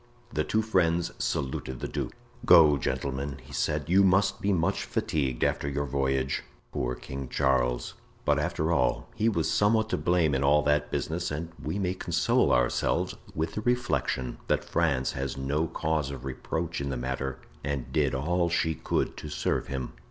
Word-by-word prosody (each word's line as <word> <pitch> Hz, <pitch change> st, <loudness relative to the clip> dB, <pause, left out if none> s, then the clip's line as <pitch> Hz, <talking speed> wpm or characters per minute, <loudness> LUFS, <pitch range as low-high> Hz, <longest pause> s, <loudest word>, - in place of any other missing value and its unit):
The 75 Hz, -, +1 dB
two 110 Hz, +6 st, +1 dB
friends 85 Hz, -5 st, +2 dB
saluted 65 Hz, -2 st, -2 dB
the -, -, -3 dB
duke. -, -, -3 dB, 0.3 s
"Go, 75 Hz, -4 st, +7 dB
gentlemen," 70 Hz, +2 st, -2 dB
he 70 Hz, -, -13 dB
said; 70 Hz, -, -1 dB
"you 95 Hz, +4 st, +5 dB
must 95 Hz, +1 st, +3 dB
be 100 Hz, -, +1 dB
much 95 Hz, +1 st, +1 dB
fatigued 65 Hz, -6 st, -1 dB
after 70 Hz, -, +1 dB
your 70 Hz, +1 st, -1 dB
voyage. 65 Hz, 0 st, 0 dB, 0.3 s
Poor 60 Hz, 0 st, -2 dB
King 70 Hz, 0 st, -7 dB
Charles! 65 Hz, -3 st, +1 dB, 0.3 s
But, -, -, +3 dB
after 80 Hz, +2 st, 0 dB
all, 65 Hz, -7 st, +1 dB
he 110 Hz, -, +2 dB
was 85 Hz, -7 st, 0 dB
somewhat 110 Hz, +2 st, +3 dB
to -, -, 0 dB
blame 85 Hz, -4 st, +2 dB
in 70 Hz, +1 st, +1 dB
all 75 Hz, +2 st, +4 dB
that 75 Hz, 0 st, +2 dB
business 85 Hz, +2 st, -2 dB
and 80 Hz, +3 st, -4 dB
we 75 Hz, +8 st, -3 dB
may 90 Hz, -2 st, 0 dB
console 85 Hz, -2 st, +2 dB
ourselves -, -, +1 dB, 0.2 s
with 80 Hz, +1 st, -1 dB
the 105 Hz, -, -3 dB
reflection 120 Hz, -, 0 dB
that -, -, +1 dB
France 65 Hz, -1 st, +1 dB
has 70 Hz, 0 st, -4 dB
no 70 Hz, +4 st, 0 dB
cause 75 Hz, -3 st, -1 dB
of 70 Hz, -2 st, -7 dB
reproach 80 Hz, +5 st, -3 dB
in 70 Hz, -, -2 dB
the 65 Hz, -, -2 dB
matter 65 Hz, +1 st, -3 dB, 0.3 s
and 70 Hz, -3 st, -3 dB
did -, -, +2 dB
all 85 Hz, +6 st, +1 dB
she 80 Hz, -1 st, +1 dB
could -, -, -1 dB
to 75 Hz, -, -7 dB
serve 75 Hz, -, -1 dB
him." 65 Hz, -2 st, -4 dB
75 Hz, 175 wpm, -28 LUFS, 65-85 Hz, 0.3 s, Go